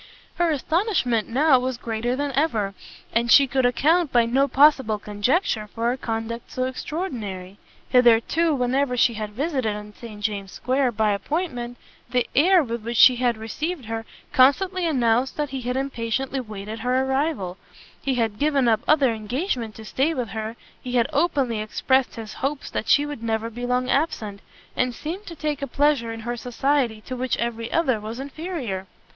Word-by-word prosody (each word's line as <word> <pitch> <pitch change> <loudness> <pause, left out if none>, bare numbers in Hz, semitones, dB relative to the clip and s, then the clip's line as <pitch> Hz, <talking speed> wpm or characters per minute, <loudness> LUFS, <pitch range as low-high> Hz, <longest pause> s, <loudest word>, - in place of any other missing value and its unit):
Her 345 -1 +2
astonishment 310 - +1
now 265 +2 +4
was 255 0 -2
greater 235 +1 -2
than 285 +1 -2
ever, 235 -8 0 0.4
and 235 +1 +1
she 280 - +8
could 260 -1 +2
account 310 +5 +2
by 240 -1 +4
no 265 +4 +2
possible 270 -6 +4
conjecture 210 - 0
for 230 +3 -1
a - - -1
conduct 225 -1 -4
so 255 - -2
extraordinary. 230 - -5 0.3
Hitherto, 250 +6 +4
whenever 250 0 0
she 235 - +4
had 215 -1 -4
visited 260 -4 -1
in 210 0 -9
St 215 -2 -10
James's 200 -3 -3
square 255 0 +1
by 220 -1 +1
appointment, 245 - -3 0.3
the 250 -1 +1
air 355 +4 +5
with 235 -3 -4
which 235 +1 +6
he 250 -2 +5
had 240 -2 +1
received 285 +7 -4
her, 225 0 -4 0.3
constantly 355 +8 +4
announced 250 -3 +1
that 295 -3 -2
he 265 -1 -4
had 250 +1 -2
impatiently 265 0 -2
waited 215 -2 -7
her 250 +3 +1
arrival; 265 - -1 0.4
he 270 -2 0
had 225 -3 -1
given 285 -4 +2
up 220 -2 +4
other 280 -6 +4
engagements 230 - -3
to 220 - -10
stay 285 +9 0
with 245 -5 -3
her, 220 +1 -5 0.3
he 250 - -6
had 240 -2 +3
openly 275 -7 +1
expressed 260 +4 +1
his 220 -2 -7
hopes 275 +2 -2
that - - -3
she 290 - +4
would 290 -5 -6
never 225 0 -2
be 245 +2 -5
long 250 0 +1
absent, 220 -9 -1 0.3
and 250 -1 0
seemed 360 +7 -6
to 335 - -7
take 300 -2 -3
a 280 - -2
pleasure 275 -3 +1
in 225 0 -6
her 240 +2 -3
society 245 -1 0
to 255 +4 -6
which 255 0 -1
every 230 -1 -3
other 270 -9 +2
was 220 +3 -6
inferior. 275 - -5
250 Hz, 175 wpm, -24 LUFS, 225-280 Hz, 0.4 s, she